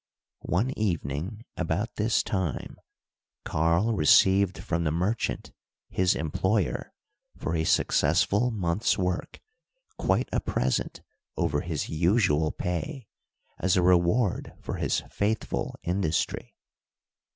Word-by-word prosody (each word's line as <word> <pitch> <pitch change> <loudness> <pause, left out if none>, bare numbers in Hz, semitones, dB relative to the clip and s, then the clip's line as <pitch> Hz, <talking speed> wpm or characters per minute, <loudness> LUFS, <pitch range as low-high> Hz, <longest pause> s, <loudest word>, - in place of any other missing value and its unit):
One 110 +9 +1
evening, 95 - -2
about 90 +6 -2
this 110 +2 +2
time, 95 - -3 0.7
Karl 85 +8 +2
received 95 +3 +4
from 85 0 -2
the 80 - +1
merchant, 95 +8 -1 0.4
his 95 -1 +2
employer, 95 +5 -1 0.5
for 80 - -2
a 80 0 0
successful 110 +8 +2
month's 100 -1 0
work, 90 -1 -2 0.6
quite - - +1
a - - +2
present - - -1 0.4
over 75 -5 +1
his 80 -4 -3
usual 80 -2 +2
pay, 110 - -4 0.5
as 95 +1 +2
a 90 - +3
reward 90 +4 +2
for - - -5
his - - 0
faithful 100 - -1
industry. 90 -3 -1
90 Hz, 105 wpm, -27 LUFS, 80-105 Hz, 0.7 s, received